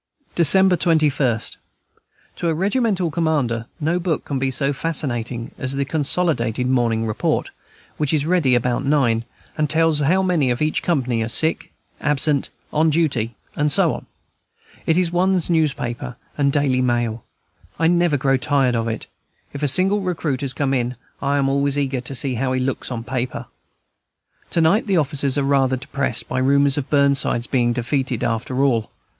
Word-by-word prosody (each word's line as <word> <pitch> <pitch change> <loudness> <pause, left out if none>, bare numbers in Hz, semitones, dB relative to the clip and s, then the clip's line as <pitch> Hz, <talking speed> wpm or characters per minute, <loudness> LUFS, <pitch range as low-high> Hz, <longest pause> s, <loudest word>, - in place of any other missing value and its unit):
December 185 +3 +6
21. 150 - +1 1.0
To 170 - -2
a 165 - +1
regimental 195 -2 0
commander 145 -9 -1
no 165 +4 0
book 170 -3 -2
can 140 -2 -3
be 135 0 0
so 135 +2 +1
fascinating 125 -5 -3
as 130 0 +1
the 140 0 -1
consolidated 135 -5 0
Morning 120 -3 +1
Report, 110 -1 -1 0.5
which 150 -2 0
is 150 -2 +1
ready 160 -7 +2
about 120 0 0
nine, 130 -6 +1 0.3
and 150 -1 +1
tells 160 -1 +2
how 175 +7 +2
many 170 -8 +1
in 125 +4 0
each 155 - 0
company 130 -9 0
are 110 - -1
sick, 160 +7 +1 0.3
absent, 150 -1 +1 0.2
on 155 +1 +3
duty, 135 -8 0 0.2
and 150 0 +1
so - - +3
on. - - -8 0.8
It 160 - +3
is 180 -2 +1
one's 180 0 +1
newspaper 140 -7 -1 0.2
and 140 -1 +1
daily 135 -3 +1
mail; 120 -3 -1 0.5
I 165 - 0
never 170 -2 +3
grow 135 0 +2
tired 135 -2 +1
of 115 0 -1
it. 110 - -4 0.5
If 140 - -6
a 145 - +1
single 190 +8 +3
recruit 165 -7 -2
has 135 -2 -2
come 135 0 -1
in, 125 -1 -1 0.3
I 140 0 0
am 135 -1 +1
always 140 +1 +1
eager 135 -3 -1
to 130 +2 -6
see 130 +1 0
how 130 +2 -1
he 130 - 0
looks 130 0 -2
on 120 -3 -4
paper. 125 0 -4 1.0
To 165 - +1
night 185 +9 +3
the 195 -3 +2
officers 145 -2 0
are 140 - +1
rather 135 -2 +2
depressed 135 +1 -2
by - - -2
rumors 140 +1 +3
of 145 -3 -4
Burnside's 140 -4 +2
being 120 -2 +1
defeated, 125 0 -2
after 120 +3 -1
all. 115 -6 +1
140 Hz, 170 wpm, -21 LUFS, 125-160 Hz, 1.0 s, December